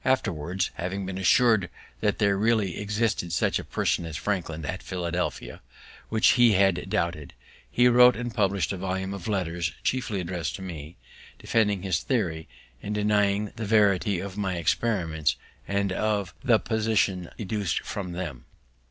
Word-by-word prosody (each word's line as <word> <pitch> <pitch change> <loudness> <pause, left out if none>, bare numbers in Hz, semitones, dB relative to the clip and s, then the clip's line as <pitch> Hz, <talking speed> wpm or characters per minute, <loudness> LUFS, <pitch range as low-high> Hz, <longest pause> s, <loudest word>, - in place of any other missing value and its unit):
Afterwards, 95 - 0
having 95 +3 -3
been 95 0 -4
assur'd 110 -1 +4 0.3
that 105 -2 +1
there 100 -2 +3
really 105 -2 +1
existed 105 -4 -1
such - - +1
a - - -6
person - - 0
as 80 -3 -5
Franklin 80 -5 -3
at 95 +4 -4
Philadelphia, 90 -1 -3 0.5
which 110 0 +4
he 120 -3 +5
had 95 -1 +2
doubted, 85 -4 -2 0.3
he 125 0 +4
wrote 125 0 +7
and 120 0 -4
published 100 -3 +1
a - - -4
volume 95 +1 -3
of 100 -1 -7
Letters, 90 -5 -1
chiefly 125 -6 -1
address'd 90 -3 -3
to 95 - -8
me, 80 -5 -8 0.4
defending 105 -4 +1
his 95 -5 +1
theory, 85 - -1 0.3
and 105 +1 -4
denying 105 0 +1
the 110 - -3
verity 100 -3 +3
of 100 +1 -6
my 95 -3 -1
experiments, 85 -4 0 0.3
and 100 0 0
of 100 -1 -1
the 120 -3 +5
positions 110 -6 0
deduc'd 105 -3 -2
from 90 -4 -5
them. 80 -9 -6
100 Hz, 150 wpm, -26 LUFS, 90-105 Hz, 0.5 s, wrote